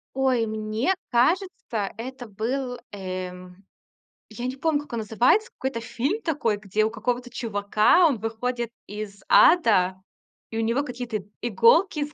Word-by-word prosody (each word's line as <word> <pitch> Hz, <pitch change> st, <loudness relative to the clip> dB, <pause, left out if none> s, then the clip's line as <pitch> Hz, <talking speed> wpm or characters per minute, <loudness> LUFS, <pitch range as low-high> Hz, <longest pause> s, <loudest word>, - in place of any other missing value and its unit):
Ой, 260 Hz, -4 st, +2 dB
мне 220 Hz, -, -1 dB, 0.2 s
кажется, 260 Hz, -, 0 dB
это 250 Hz, +1 st, -7 dB
был, 245 Hz, +5 st, -3 dB
эм, 185 Hz, -1 st, -7 dB, 0.6 s
я 240 Hz, +3 st, -6 dB
не 255 Hz, -, -2 dB
помню, 295 Hz, +1 st, 0 dB
как 295 Hz, -, -13 dB
он 235 Hz, -, -1 dB
называется, 245 Hz, -, +2 dB
какой-то 265 Hz, -3 st, -2 dB
фильм 270 Hz, -, -2 dB
такой, 285 Hz, -, 0 dB
где 210 Hz, +1 st, 0 dB
у 220 Hz, -, -1 dB
какого-то 245 Hz, +3 st, -2 dB
чувака, 215 Hz, -, +3 dB
он 270 Hz, -8 st, 0 dB
выходит 235 Hz, +2 st, -3 dB, 0.2 s
из 205 Hz, -1 st, -7 dB
ада, 205 Hz, -, +5 dB, 0.6 s
и 225 Hz, -, -4 dB
у -, -, +1 dB
него 230 Hz, +5 st, +1 dB
какие-то 245 Hz, -4 st, -4 dB, 0.2 s
иголки 240 Hz, -, +4 dB
из 295 Hz, 0 st, -3 dB
235 Hz, 145 wpm, -25 LUFS, 215-265 Hz, 0.6 s, ада